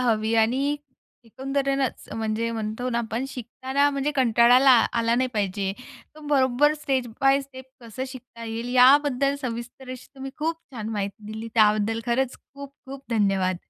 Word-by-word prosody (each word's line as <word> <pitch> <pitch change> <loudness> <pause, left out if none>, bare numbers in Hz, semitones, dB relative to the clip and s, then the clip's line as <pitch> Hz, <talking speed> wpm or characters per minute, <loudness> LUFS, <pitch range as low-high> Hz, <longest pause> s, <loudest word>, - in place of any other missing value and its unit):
हवी 225 -2 +1
आणि 260 +6 +2 0.5
एकंदरेनच 275 +2 -2
म्हणजे 225 +1 -2
म्हणतो 220 +2 -3
ना 235 - 0
आपण 235 +2 -3
शिकताना 265 +3 -1
म्हणजे 280 +1 -1
कंटाळला 250 +1 +5 0.2
आला 230 -1 +1
नाही 255 +1 +1
पाहिजे 195 -1 -1 0.4
तर 310 - -14
बरोबर 270 +2 +3
स्टेप 270 -4 -1 0.2
बाय 270 +1 +4
स्टेप 260 -1 -12 0.2
कसं 235 +2 -6
शिकता 250 -3 -11
येईल, 230 +2 -5
याबद्दल 275 +1 +5
सविस्तर 245 +1 -6
असी 255 -1 -10
तुम्ही 270 0 -7
खूप 320 +2 -1 0.2
छान 220 -3 -5
माहिती 205 -1 -4
दिली 225 +1 -6
त्याबद्दल 215 0 +3
खरंच 250 +2 0 0.2
खूप, 280 0 -9 0.2
खूप 270 0 -9
धन्यवाद. 195 -4 +1
245 Hz, 150 wpm, -24 LUFS, 225-270 Hz, 0.5 s, कंटाळला